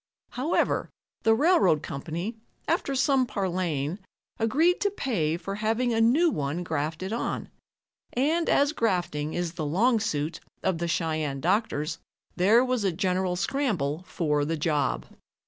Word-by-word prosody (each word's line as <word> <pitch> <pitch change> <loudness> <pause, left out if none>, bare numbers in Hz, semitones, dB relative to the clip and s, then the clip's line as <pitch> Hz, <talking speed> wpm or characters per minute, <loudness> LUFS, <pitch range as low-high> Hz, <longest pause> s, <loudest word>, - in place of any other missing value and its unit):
However, 280 +7 0 0.3
the 225 0 +4
railroad 305 - +4
company, 170 - -4 0.3
after 275 - 0
some 270 -1 +3
parleying, 180 -5 -2 0.4
agreed 305 +11 +2
to 405 - +3
pay 175 - -1
for 185 +3 -5
having 225 +4 0
a 225 - +2
new 300 +9 +4
one 150 - -2
grafted 160 +5 -3
on, 235 - -3 0.6
and 315 +7 +1
as 285 +1 +4
grafting 175 - -1
is 175 -1 -1
the 170 -3 -4
long 225 - +3
suit 155 -7 -2 0.2
of 180 -3 0
the 170 - -1
Cheyenne 155 -4 -1
doctors, 175 - 0 0.4
there 215 +8 +5
was 250 -4 0
a 195 - +2
general 185 0 0
scramble 185 - -1
for 150 -4 0
the 160 +2 -1
job. 150 -2 0
185 Hz, 140 wpm, -27 LUFS, 160-240 Hz, 0.6 s, there